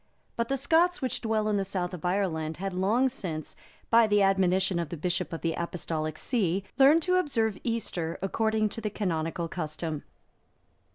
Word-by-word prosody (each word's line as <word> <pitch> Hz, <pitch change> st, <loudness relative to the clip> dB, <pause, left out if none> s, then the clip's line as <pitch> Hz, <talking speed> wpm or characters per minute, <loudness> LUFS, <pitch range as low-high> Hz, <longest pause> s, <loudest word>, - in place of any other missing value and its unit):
But 235 Hz, 0 st, -1 dB
the 275 Hz, -, 0 dB
Scots 335 Hz, +6 st, +3 dB
which 255 Hz, -3 st, -2 dB
dwelt 220 Hz, -1 st, 0 dB
in 210 Hz, -1 st, +1 dB
the 195 Hz, -, +1 dB
South 185 Hz, -2 st, -3 dB
of 175 Hz, -, -7 dB
Ireland 165 Hz, -4 st, -1 dB
had 195 Hz, 0 st, -3 dB
long 210 Hz, +8 st, +2 dB
since, 170 Hz, -, -5 dB, 0.4 s
by 230 Hz, -1 st, +6 dB
the 205 Hz, -1 st, +4 dB
admonition 190 Hz, -1 st, +2 dB
of 170 Hz, -, -3 dB
the 170 Hz, -, -5 dB
Bishop 175 Hz, +3 st, -2 dB
of 165 Hz, -, -5 dB
the 165 Hz, -1 st, 0 dB
Apostolic 160 Hz, -2 st, -3 dB
see, 195 Hz, -6 st, 0 dB, 0.2 s
learned 295 Hz, +5 st, +6 dB
to 365 Hz, 0 st, +2 dB
observe 230 Hz, -, 0 dB
Easter 180 Hz, -8 st, -2 dB
according 215 Hz, +2 st, +1 dB
to 225 Hz, -, -6 dB
the 210 Hz, -, -1 dB
canonical 170 Hz, -4 st, -2 dB
custom. 155 Hz, -2 st, -4 dB
195 Hz, 175 wpm, -28 LUFS, 170-225 Hz, 0.4 s, by